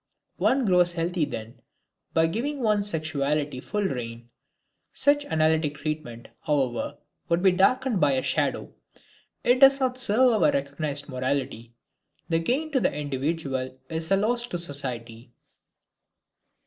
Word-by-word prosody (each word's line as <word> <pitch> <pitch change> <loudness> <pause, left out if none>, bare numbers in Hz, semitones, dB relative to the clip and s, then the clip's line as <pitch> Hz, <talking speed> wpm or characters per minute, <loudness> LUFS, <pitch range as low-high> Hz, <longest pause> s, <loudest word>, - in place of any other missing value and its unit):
One 265 -1 +2
grows 180 -3 +3
healthy 170 -1 -1
then, 115 -1 -8 0.5
by 160 0 +4
giving 250 - -2
one's 210 -2 +2
sexuality 150 -4 -1
full 210 +8 -2
reign. 120 -7 -5 0.6
Such 290 0 +2
analytic 155 - +1
treatment, 145 -6 -5 0.2
however, 140 -1 -1 0.3
would 170 +2 +1
be 190 - +6
darkened 225 +4 +2
by 145 -2 +4
a 130 - 0
shadow; - - -1 0.7
it 245 +1 +3
does 270 0 +7
not 255 -1 0
serve 240 0 +4
our - - +5
recognized 140 +1 -3
morality. 130 -3 -3 0.5
The 165 -1 +2
gain 275 - -1
to 270 - +2
the 195 - +1
individual 140 -2 -3
is 160 0 -3
a 195 - +4
loss 235 +4 0
to 175 - -3
society. 125 -7 -5
160 Hz, 135 wpm, -26 LUFS, 135-210 Hz, 0.7 s, does